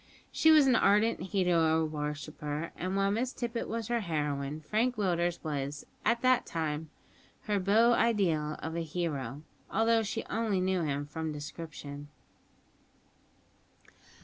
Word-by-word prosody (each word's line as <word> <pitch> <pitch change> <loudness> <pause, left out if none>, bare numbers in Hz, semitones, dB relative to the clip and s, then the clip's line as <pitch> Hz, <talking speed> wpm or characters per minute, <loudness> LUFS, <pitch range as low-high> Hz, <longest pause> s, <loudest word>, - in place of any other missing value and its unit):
She 320 - +4
was 310 -3 +7
an 260 -2 +4
ardent 210 +3 +3
hero 170 -4 +2
worshipper; 150 +1 -4
and 185 +2 -3
while 195 0 +2
Miss 240 +4 0
Tippet 235 -1 -3
was 230 -1 -3
her 240 0 +1
heroine, 150 -5 -2
Frank 220 +10 0
Willders 175 -4 0
was, 145 -2 -3 0.2
at 235 - +2
that 255 -1 +4
time, 160 -1 -3 0.5
her 210 -1 0
beau 220 +5 +4
ideal 175 -11 +1
of 160 +1 -4
a - - -1
hero, 150 -5 -3 0.3
although 225 +2 +3
she 220 +1 -3
only 220 -4 0
knew 185 0 +1
him 145 -2 -1
from 160 +2 -4
description. 145 -1 -7
170 Hz, 135 wpm, -30 LUFS, 150-220 Hz, 0.5 s, was